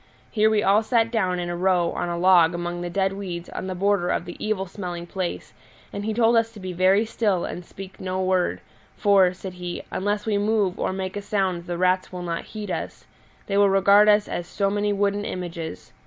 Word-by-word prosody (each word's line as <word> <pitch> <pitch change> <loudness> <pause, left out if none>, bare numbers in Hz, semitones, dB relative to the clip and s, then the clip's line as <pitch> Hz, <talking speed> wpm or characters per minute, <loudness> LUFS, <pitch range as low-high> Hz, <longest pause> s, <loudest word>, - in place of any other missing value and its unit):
Here 215 -1 +3
we 215 -1 +2
all 200 +3 +4
sat 230 0 +1
down 185 -6 0
in 175 0 -3
a 175 - -3
row 180 -1 +2
on 175 - -3
a 170 - -2
log 175 -1 +5
among 175 0 -4
the 175 - -3
dead 195 +1 0
weeds 180 -3 -6
on 185 - -5
the 185 - -3
border 195 -1 +1
of 175 - -1
the 175 - -8
evil 215 -3 -1
smelling 175 -2 -6
place, 180 0 -5 0.4
and 200 - -4
he 220 - -1
told 230 +1 +3
us 225 0 +2
to 215 - -11
be 185 -1 -5
very 190 +4 +3
still 210 -5 0
and 180 - -6
speak 190 +2 -11
no 185 0 -3
word; 185 -1 0 0.4
for, 195 -4 +4
said 185 0 -8
he, 180 -1 -6
unless 205 +2 -1
we 210 -2 +1
move 205 -3 +1
or - - 0
make 190 0 -4
a 205 - -3
sound 190 -4 -1
the 175 -1 -3
rats 185 +1 +1
will 180 -1 -6
not 170 -1 -3
heed 210 -3 -6
us; - - -5 0.4
they 200 - -1
will 200 -1 +5
regard 200 +2 +5
us 210 0 +4
as 175 - -4
so 195 -1 -1
many 205 0 0
wooden 205 0 0
images. 170 - -6
190 Hz, 225 wpm, -24 LUFS, 180-205 Hz, 0.4 s, log